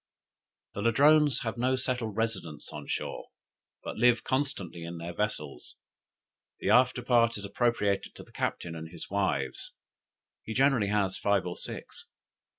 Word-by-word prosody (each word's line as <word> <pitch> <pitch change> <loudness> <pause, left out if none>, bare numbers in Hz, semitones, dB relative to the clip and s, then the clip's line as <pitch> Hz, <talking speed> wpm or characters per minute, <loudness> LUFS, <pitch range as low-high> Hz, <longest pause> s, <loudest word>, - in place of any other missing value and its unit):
"The 100 - -4
Ladrones 145 +6 +5
have 115 0 -3
no 130 +2 +2
settled 125 -5 -2
residence 95 -10 -2
on - - -7
shore, - - -3 0.6
but - - -6
live 120 +1 +4
constantly 130 - -2
in 85 +1 -6
their 85 +1 -6
vessels. 85 -9 -3 0.8
The - - +1
after 125 0 +4
part 115 -2 +3
is 100 - -5
appropriated 105 -2 0
to - - -10
the - - -20
captain 85 -1 -3
and 80 0 -7
his 85 - -9
wives; 95 -9 -1 0.7
he 110 - -6
generally 135 -6 +4
has 100 -2 +1
five 100 -2 +2
or 90 -1 -4
six. - - -5
110 Hz, 150 wpm, -29 LUFS, 95-125 Hz, 0.8 s, Ladrones